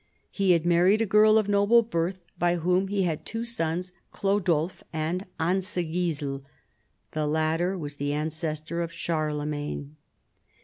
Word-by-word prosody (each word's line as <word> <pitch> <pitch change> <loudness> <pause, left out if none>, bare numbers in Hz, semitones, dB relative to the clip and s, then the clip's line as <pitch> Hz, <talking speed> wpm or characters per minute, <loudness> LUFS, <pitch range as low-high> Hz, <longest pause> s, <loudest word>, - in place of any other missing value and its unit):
He 195 -3 +3
had 170 -1 +1
married 175 +4 +4
a - - 0
girl 215 +1 +5
of 215 -2 +2
noble 205 +3 +5
family, 180 -3 -1 0.2
b}' 175 0 +3
whom 180 +3 +1
he 200 0 0
had 165 -4 -1
two 225 +1 -4
sons, 180 -5 -3 0.2
Chlodulf 185 -4 0
and 165 +4 -2
Ansigisel. 170 -5 -1 0.7
The 155 -1 -1
latter 160 +4 +1
was 145 -4 -6
the 145 0 -1
ancestor 155 +2 -2
of 165 -1 -3
Charlemagne. 150 -2 -3
170 Hz, 135 wpm, -27 LUFS, 155-190 Hz, 0.7 s, girl